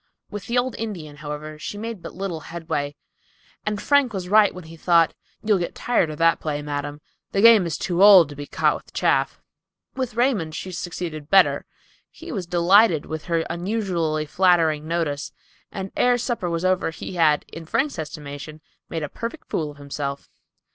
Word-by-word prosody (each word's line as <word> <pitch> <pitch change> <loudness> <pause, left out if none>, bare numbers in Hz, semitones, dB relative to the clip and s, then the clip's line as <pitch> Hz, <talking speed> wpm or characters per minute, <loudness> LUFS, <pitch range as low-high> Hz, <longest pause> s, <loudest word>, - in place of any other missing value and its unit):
With 205 -1 -6
the 235 - 0
old 250 +1 0
Indian, 170 -10 -6
however, 150 +1 -7
she 205 - -6
made 225 -2 -5
but - - -9
little 185 -3 -4
headway; 150 -4 -3 0.7
and 210 -1 -1
Frank 285 -2 +3
was 185 -2 -4
right 210 0 +6
when 185 - -10
he 160 +1 -12
thought, 165 0 +3 0.3
"You'll 210 -3 +3
get 175 - -4
tired 240 -9 +1
of 155 - -6
that 165 0 +3
play, 150 -1 -3
madam; 145 0 -4 0.3
the 195 - +2
game 225 -5 +7
is 160 - -3
too 180 0 -1
old 195 -5 +9
to 145 - -9
be 145 0 -7
caught - - +2
with - - -10
chaff." - - +1 0.6
With 255 -4 -3
Raymond 225 - +1
she 185 - -5
succeeded 165 -4 -5
better. 160 -8 +4 0.4
He 340 +1 -10
was 190 - -4
delighted 175 0 +4
with 160 -1 -6
her 170 -2 +1
unusually 170 -4 -1
flattering 160 -3 +2
notice; 160 -3 -2 0.4
and 195 -1 -5
ere 245 0 +3
supper 235 -6 -2
was 170 +1 -2
over 185 -2 +2
he 160 - -7
had, 155 -4 +3
in 165 -1 -8
Frank's 275 - 0
estimation, 150 0 -7 0.3
made 165 -2 -3
a - - -2
perfect 230 - -7
fool 155 -3 -1
of 145 - -12
himself. 140 0 -5
170 Hz, 180 wpm, -23 LUFS, 155-205 Hz, 0.7 s, old